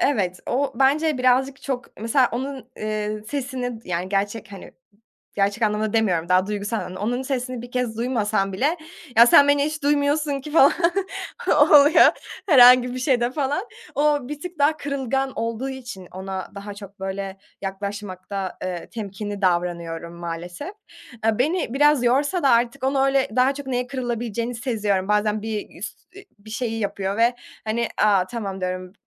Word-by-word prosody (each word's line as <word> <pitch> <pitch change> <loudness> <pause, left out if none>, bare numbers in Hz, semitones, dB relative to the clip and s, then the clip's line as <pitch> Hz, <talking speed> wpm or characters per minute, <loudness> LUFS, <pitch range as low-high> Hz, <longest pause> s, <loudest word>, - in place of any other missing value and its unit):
Evet. 190 -10 +1
O 275 +3 0
bence 280 +3 +2
birazcık 260 +2 +2
çok 265 -1 -3
Mesela 240 +3 +3
onun, 260 0 -5
eee, 215 0 -3
sesini 255 -4 -4
yani, 180 +1 -3
gerçek, 200 +2 -2
hani, 195 - -10 0.6
gerçek 200 +3 0
anlamda 210 0 0
demiyorum, 180 -7 +1
daha 185 +1 +3
duygusal 205 +2 -2
anlamda. 185 -2 -6
Onun 245 +5 -1
sesini 255 -2 -3
bir 245 - -10
kez 245 -3 -2
duymasan 215 -5 0
bile, 285 - +1 0.4
"Ya, 235 +1 +9
sen 285 +4 +7
beni 285 0 +4
hiç 305 0 -4
duymuyorsun 285 0 +1
ki," 295 +3 -9
falan, 285 -3 +6 1.0
oluyor, 295 0 +7 0.4
herhangi 250 -3 +7
bir 255 - -4
şeyde, 250 -2 +2
falan. 290 +6 -1 0.3
O 290 -2 +1
bir 295 0 -6
tık 355 0 -8
daha 295 +2 +3
kırılgan 270 -2 -2
olduğu 230 +3 -2
için 245 -9 -8
ona 190 0 -5
daha 200 0 -7
çok 200 -1 -12
böyle 195 0 -4 0.2
yaklaşmakta, 195 -1 -5
eee, 180 -2 -4
temkinli 205 -1 -6
davranıyorum 170 -2 -1
maalesef. 175 - -6 0.5
Eee, 225 -1 +2
beni 295 0 0
biraz 295 -2 +4
yorsa 285 +9 +2
da 275 - +4
artık, 240 +3 +2
onu 270 0 +2
öyle 270 -1 +2
daha 260 +2 +4
çok 285 0 -8
neye 250 -1 -1
kırılabileceğini 240 -2 -3
seziyorum. 210 -5 -1
Bazen 210 0 +1
bir 215 -4 -5
üst 215 - -9
e 400 - -11
bir 210 +2 -14
şeyi 225 0 -2
yapıyor 200 -1 -2
ve, 235 +2 +3 0.3
hani, 225 +1 -1
"A, 200 -3 +4
tamam" 195 -4 -5
diyorum, 185 0 -4
235 Hz, 160 wpm, -23 LUFS, 200-270 Hz, 1.0 s, Ya